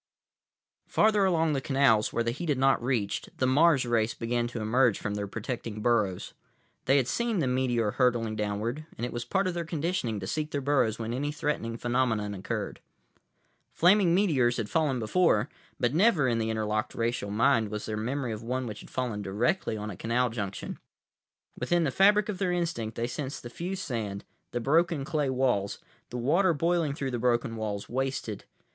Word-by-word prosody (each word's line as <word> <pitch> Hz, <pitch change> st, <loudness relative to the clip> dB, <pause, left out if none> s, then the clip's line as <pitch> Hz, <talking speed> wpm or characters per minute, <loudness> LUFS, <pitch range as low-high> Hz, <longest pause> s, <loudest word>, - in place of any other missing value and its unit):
———— -, -, -60 dB
Farther 210 Hz, -2 st, +5 dB
along 165 Hz, -4 st, +2 dB
the 135 Hz, -, -1 dB
canals, 135 Hz, -6 st, +3 dB
where 115 Hz, -, 0 dB
the 115 Hz, -, 0 dB
heat 160 Hz, +7 st, -5 dB
had 145 Hz, -, +2 dB
not 135 Hz, -2 st, +3 dB
reached, 120 Hz, -6 st, -2 dB
the 130 Hz, -, +1 dB
Mars 140 Hz, +1 st, +4 dB
race 115 Hz, -1 st, +1 dB
began 120 Hz, 0 st, -1 dB
to 120 Hz, -1 st, -6 dB
emerge 115 Hz, +1 st, +3 dB
from 105 Hz, -, -3 dB
their 105 Hz, 0 st, -3 dB
protecting 110 Hz, +1 st, -5 dB
burrows. 105 Hz, -6 st, +1 dB, 0.5 s
They 135 Hz, +2 st, +4 dB
had 130 Hz, -3 st, +2 dB
seen 235 Hz, -, 0 dB
the 160 Hz, -, +1 dB
meteor 125 Hz, -4 st, +1 dB
hurtling 120 Hz, -3 st, +1 dB
downward, 110 Hz, +8 st, -3 dB
and 120 Hz, -, -2 dB
it 125 Hz, -, -5 dB
was 120 Hz, 0 st, -4 dB
part 190 Hz, +10 st, +1 dB
of 185 Hz, -, 0 dB
their 170 Hz, 0 st, -2 dB
conditioning 160 Hz, -, -2 dB
to 95 Hz, -, -5 dB
seek 150 Hz, +9 st, -2 dB
their 145 Hz, -, -2 dB
burrows 135 Hz, -6 st, +1 dB
when 115 Hz, 0 st, -4 dB
any 145 Hz, +4 st, -1 dB
threatening 145 Hz, -7 st, -2 dB
phenomenon 120 Hz, -4 st, 0 dB
occurred. 95 Hz, -1 st, -4 dB, 0.9 s
Flaming 180 Hz, 0 st, +4 dB
meteors 135 Hz, -12 st, +2 dB
had 110 Hz, -3 st, -3 dB
fallen 150 Hz, -5 st, +1 dB
before, 120 Hz, +1 st, +2 dB, 0.3 s
but 120 Hz, -1 st, +1 dB
never 175 Hz, -, +4 dB
in 115 Hz, -2 st, +1 dB
the 110 Hz, 0 st, -1 dB
interlocked 110 Hz, 0 st, -1 dB
racial 115 Hz, -3 st, -1 dB
mind 110 Hz, +1 st, +2 dB
was 105 Hz, 0 st, -4 dB
there 110 Hz, -, -3 dB
memory 125 Hz, +3 st, -2 dB
of 110 Hz, 0 st, -5 dB
one 125 Hz, +2 st, -2 dB
which 105 Hz, -3 st, -6 dB
had -, -, -12 dB
fallen 120 Hz, -5 st, -2 dB
directly 110 Hz, -, 0 dB
on 105 Hz, 0 st, -5 dB
a -, -, -7 dB
canal 120 Hz, +5 st, 0 dB
junction. 100 Hz, -4 st, -5 dB, 0.8 s
Within 175 Hz, -1 st, +1 dB
the 145 Hz, -, 0 dB
fabric 205 Hz, +5 st, +4 dB
of 200 Hz, -3 st, -4 dB
their 185 Hz, -2 st, +1 dB
instinct, 165 Hz, -11 st, -2 dB
they 115 Hz, -, -1 dB
sensed 135 Hz, +3 st, -5 dB
the 120 Hz, -, -8 dB
fused 185 Hz, +7 st, -4 dB
sand, 105 Hz, -5 st, -4 dB, 0.2 s
the 120 Hz, -, -3 dB
broken 160 Hz, +3 st, +2 dB
clay 150 Hz, -2 st, 0 dB
walls, 125 Hz, -7 st, 0 dB, 0.3 s
the 125 Hz, -, -5 dB
water 165 Hz, +8 st, +3 dB
boiling 165 Hz, -1 st, +1 dB
through 135 Hz, -2 st, -3 dB
the 120 Hz, -, -2 dB
broken 120 Hz, 0 st, +1 dB
walls, 105 Hz, -2 st, -4 dB
wasted. 130 Hz, -5 st, -3 dB
125 Hz, 190 wpm, -28 LUFS, 110-150 Hz, 0.9 s, Farther